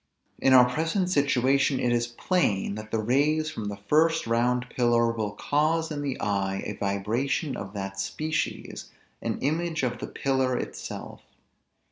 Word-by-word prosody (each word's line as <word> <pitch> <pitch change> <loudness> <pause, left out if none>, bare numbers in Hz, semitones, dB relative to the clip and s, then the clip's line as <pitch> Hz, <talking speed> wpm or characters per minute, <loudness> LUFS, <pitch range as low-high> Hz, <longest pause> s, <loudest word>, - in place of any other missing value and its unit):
In 135 - +4
our 125 -1 +8
present 165 +7 0
situation 140 -2 +2
it 120 - +1
is 120 0 +1
plain, 120 - 0
that 110 +1 -7
the 115 - -1
rays 145 +7 +1
from 110 - -5
the 100 -1 -4
first 160 +10 +2
round 120 +2 +1
pillar 120 -1 +3
will 110 -3 -3
cause 155 +7 0
in 145 -1 -3
the 140 -2 -3
eye 95 -1 -1
a - - -3
vibration 115 - -1
of 100 0 -7
that 95 -1 -5
species; 155 +9 -3 0.3
an - - -2
image 160 +2 -1
of 120 -1 -1
the - - -5
pillar 130 -2 0
itself. - - -6
125 Hz, 155 wpm, -27 LUFS, 110-150 Hz, 0.3 s, our